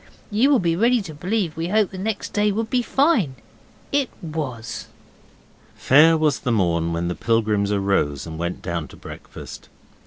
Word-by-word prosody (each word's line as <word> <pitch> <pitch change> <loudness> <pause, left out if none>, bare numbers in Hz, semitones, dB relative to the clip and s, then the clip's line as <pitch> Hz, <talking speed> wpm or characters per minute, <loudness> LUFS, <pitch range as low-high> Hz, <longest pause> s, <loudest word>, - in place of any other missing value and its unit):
You 225 +7 +3
will 285 - +5
be 170 -6 +1
ready 235 +6 +3
to 165 -5 -8
believe 180 +2 -2
we 165 +1 -2
hoped 210 +1 +1
next 200 +3 -3
day 210 0 +2
would 225 +2 -3
be 250 - +2
fine. 240 - +2 0.6
It 280 -4 +1
was. 130 - -5 0.9
Fair 160 +4 +5
was 155 -2 +1
the 125 - -1
morn 85 -6 +1
when 85 +1 -1
the 90 - -1
pilgrims 105 -1 +1
arose 95 -8 0
and 80 -1 -7
went 85 +1 -3
down 85 -3 -3
to - - -14
breakfast. - - -10
155 Hz, 165 wpm, -22 LUFS, -, 0.9 s, will